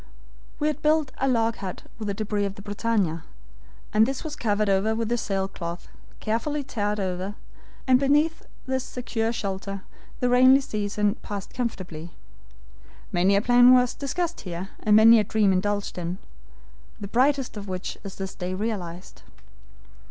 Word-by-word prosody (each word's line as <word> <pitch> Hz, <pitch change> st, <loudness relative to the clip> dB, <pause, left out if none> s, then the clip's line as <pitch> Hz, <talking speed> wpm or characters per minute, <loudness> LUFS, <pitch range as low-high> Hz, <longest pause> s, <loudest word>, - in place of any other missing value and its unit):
"We 295 Hz, -, -2 dB
had 305 Hz, -1 st, -1 dB
built 305 Hz, -3 st, +2 dB
a 270 Hz, -, +1 dB
log 230 Hz, -3 st, +1 dB
hut 185 Hz, -2 st, -6 dB, 0.2 s
with 215 Hz, -, -4 dB
the 200 Hz, -, -2 dB
DEBRIS 210 Hz, -1 st, -1 dB
of 195 Hz, -, -7 dB
the 200 Hz, -, -11 dB
BRITANNIA, 205 Hz, -5 st, 0 dB, 0.7 s
and 215 Hz, +1 st, +5 dB
this 270 Hz, 0 st, -3 dB
was 310 Hz, -2 st, -5 dB
covered 210 Hz, -4 st, 0 dB
over 200 Hz, +3 st, +2 dB
with 230 Hz, +1 st, 0 dB
sail 195 Hz, -2 st, -1 dB
cloth, 170 Hz, -2 st, -7 dB, 0.3 s
carefully 280 Hz, +7 st, -1 dB
tarred 210 Hz, -5 st, -2 dB
over, 190 Hz, +1 st, -3 dB, 0.5 s
and 255 Hz, -1 st, +5 dB
beneath 295 Hz, +4 st, +2 dB, 0.2 s
this 260 Hz, -1 st, -1 dB
secure 230 Hz, -3 st, -2 dB
shelter 195 Hz, -2 st, -4 dB, 0.4 s
the 250 Hz, -, +1 dB
rainy 255 Hz, +2 st, +6 dB
season 210 Hz, -2 st, -1 dB
passed 200 Hz, -2 st, -6 dB
comfortably. 180 Hz, -9 st, -4 dB, 1.0 s
Many 185 Hz, +3 st, +3 dB
a 200 Hz, -, +2 dB
plan 245 Hz, +1 st, +7 dB
was 250 Hz, -1 st, +3 dB
discussed 340 Hz, +5 st, -3 dB
here, 180 Hz, +1 st, -6 dB
and 210 Hz, -1 st, +3 dB
many 225 Hz, +1 st, +8 dB
a -, -, +3 dB
dream 205 Hz, -1 st, +2 dB
indulged 205 Hz, 0 st, -1 dB
in, 175 Hz, +1 st, -3 dB, 0.8 s
the 200 Hz, -, -5 dB
brightest 265 Hz, +4 st, +1 dB
of 205 Hz, -1 st, -7 dB
which 185 Hz, -1 st, -4 dB
is 195 Hz, -1 st, -7 dB
this 190 Hz, -1 st, -5 dB
day 180 Hz, 0 st, -4 dB
realized. 185 Hz, -4 st, -5 dB
210 Hz, 160 wpm, -25 LUFS, 195-250 Hz, 1.0 s, many